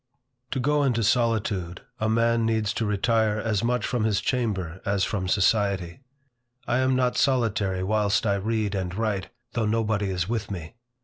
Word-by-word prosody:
TO 135 - -2
go 145 +3 +2
into 120 -5 +1
solitude, 105 -6 0 0.2
a 110 - 0
man 115 +1 +2
needs 110 -2 0
to 110 - -1
retire 110 +1 +1
as 110 -1 -1
much 125 +1 0
from 120 -4 -1
his 105 -2 +2
chamber 95 -7 -2
as 100 -1 0
from 95 -4 -1
society. 100 -3 +1 0.7
I 120 - +1
am 130 0 +2
not 125 -1 +1
solitary 110 -8 +1
whilst 105 +1 +1
I 100 - +2
read 105 0 -1
and 95 -2 -3
write, 105 -3 -2 0.2
though 115 -2 0
nobody 110 -2 0
is 90 -2 -1
with 110 -2 -2
me. 85 -5 -6
110 Hz, 170 wpm, -25 LUFS, 100-115 Hz, 0.7 s, go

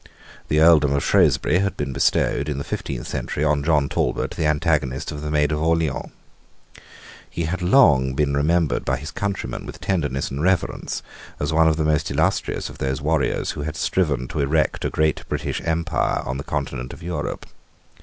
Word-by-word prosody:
The 75 - +2
earldom 80 -3 +6
of 70 - 0
Shrewsbury 90 - +3
had 100 -2 -1
been 70 - -3
bestowed, 70 +1 +1
in 75 - -2
the 70 - -3
fifteenth - - -5
century, 75 - -3
on 75 -1 +2
John 75 -3 +2
Talbot, - - -1
the 80 - -1
antagonist 75 -4 0
of 75 - -6
the 75 - -4
Maid 75 -1 +2
of 75 0 -1
Orleans. 80 -3 0 1.2
He 85 - -3
had 85 +3 -2
been 90 -1 -1
long 65 - +5
remembered 75 0 +1
by - - 0
his 75 +4 -7
countrymen 100 +1 -3
with - - -9
tenderness 75 -8 -1
and 70 +2 -3
reverence 85 -8 0 0.4
as - - -1
one 80 0 +5
of 80 -1 +2
the 80 - 0
most 75 -1 +1
illustrious - - 0
of - - -11
those 65 0 -1
warriors 75 0 0
who - - -6
had 75 +1 -4
striven 75 -7 0
to - - -4
erect 75 0 +1
a - - +1
great 80 -1 +1
English - - -2
empire 80 0 0
on 65 - -3
the 70 - -5
Continent 70 -5 -4
of - - -12
Europe. 85 -3 -4
75 Hz, 185 wpm, -22 LUFS, 70-80 Hz, 1.2 s, earldom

